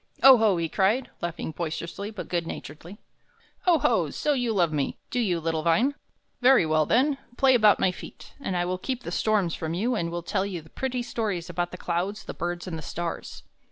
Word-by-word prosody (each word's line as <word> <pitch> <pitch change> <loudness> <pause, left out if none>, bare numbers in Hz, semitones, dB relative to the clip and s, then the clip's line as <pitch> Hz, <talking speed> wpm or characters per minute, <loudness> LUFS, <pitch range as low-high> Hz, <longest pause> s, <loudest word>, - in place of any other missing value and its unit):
"Oho!" 225 -8 +7
he 165 -1 0
cried, 205 +10 +1
laughing 170 -1 -3
boisterously, 170 +5 -4
but 215 -3 -7
good 170 -2 -1
naturedly, 165 +7 -8 0.7
"oho! 340 -3 +3
so 300 - 0
you 245 -4 0
love 175 -7 +2
me, 145 -2 -1
do 250 - 0
you, 185 -8 +1
little 160 -1 -1
vine? 225 - +3 0.5
Very 255 -7 +6
well, 155 -1 +2
then; 270 +3 +2 0.2
play 265 -1 +5
about 215 -4 +5
my 185 - +3
feet, - - -11
and 190 -9 -2
I 175 - +1
will 180 +1 -2
keep 250 +3 -3
the - - -5
storms 205 -6 +1
from 160 0 -3
you 230 +8 0
and 170 -7 -1
will 170 0 -4
tell 190 - 0
you 185 -5 -5
pretty 250 +9 -3
stories 205 -8 -3
about 175 +1 -1
the 180 - -8
clouds, 180 +5 -2
the - - -7
birds, 175 0 -4
and 165 -4 -5
the - - -7
stars." 170 +3 -5
185 Hz, 200 wpm, -26 LUFS, 170-235 Hz, 0.7 s, Oho